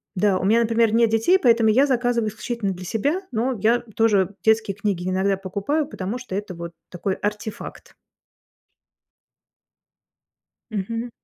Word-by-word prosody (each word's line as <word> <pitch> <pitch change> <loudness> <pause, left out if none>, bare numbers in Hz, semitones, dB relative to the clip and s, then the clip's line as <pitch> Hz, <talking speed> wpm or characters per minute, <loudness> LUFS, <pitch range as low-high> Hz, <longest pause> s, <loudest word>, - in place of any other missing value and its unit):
да, 195 0 +2
у - - -4
меня, 225 +4 +4
например, 230 -1 +2
нет 230 0 +4
детей, 225 +13 +3
поэтому 230 -6 +4
я 270 +6 +4
заказываю 245 -3 +1
исключительно 220 -1 -3
для 185 0 -7
себя. 285 - -1
Но 245 +3 0
я 225 +4 +3 0.2
тоже 205 -3 +2
детские 220 -3 +2
книги 195 -3 -2
иногда 190 +1 +1
покупаю, 200 +11 -2
потому 205 -2 -5
что 250 -7 -7
это 200 -2 -4
вот 170 0 -7 0.2
такой 190 +2 -3
артефакт. 210 +1 -6 2.8
Мгм. 230 +4 -3
220 Hz, 140 wpm, -23 LUFS, 195-235 Hz, 2.8 s, меня